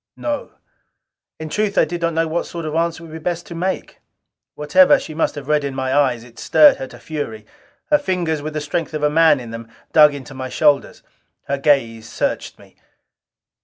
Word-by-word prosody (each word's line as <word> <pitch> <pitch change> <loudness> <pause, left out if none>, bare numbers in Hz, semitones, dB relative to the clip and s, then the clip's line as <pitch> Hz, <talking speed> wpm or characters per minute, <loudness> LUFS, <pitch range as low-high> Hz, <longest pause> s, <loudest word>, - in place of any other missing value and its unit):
"No." 295 -1 -4 0.9
In 160 - -5
truth, 210 +3 -1
I - - +5
did 175 -1 -5
not 170 0 0
know 165 0 +1
what 165 +2 -2
sort 170 -1 -6
of 155 - -4
answer 170 +1 -1
it - - -9
would 160 - -12
be 160 - -6
best 175 +1 -3
to - - -9
make. 185 +3 -4 0.6
Whatever 275 - +5
she 155 - -8
must 160 - -1
have 140 -2 -8
read 150 -1 +2
in 140 -1 -4
my 130 0 -2
eyes, 130 -5 +2
it 120 -2 -15
stirred 300 -2 +5
her 135 - -6
to - - -13
fury. 115 -9 -6 0.5
Her 295 - +5
fingers 175 - -1
with 155 +1 -6
the 155 - -2
strength 155 +1 -3
of 150 - -3
a 150 - +3
man 160 -2 +5
in 120 -2 -9
them, 115 0 -8 0.3
dug 150 -2 +6
into 140 0 -9
my 130 -1 -6
shoulders. 145 +1 +1 0.4
Her 140 0 -1
gaze 115 -6 +1
searched - - -3
me. - - -20
155 Hz, 210 wpm, -20 LUFS, 135-170 Hz, 0.9 s, dug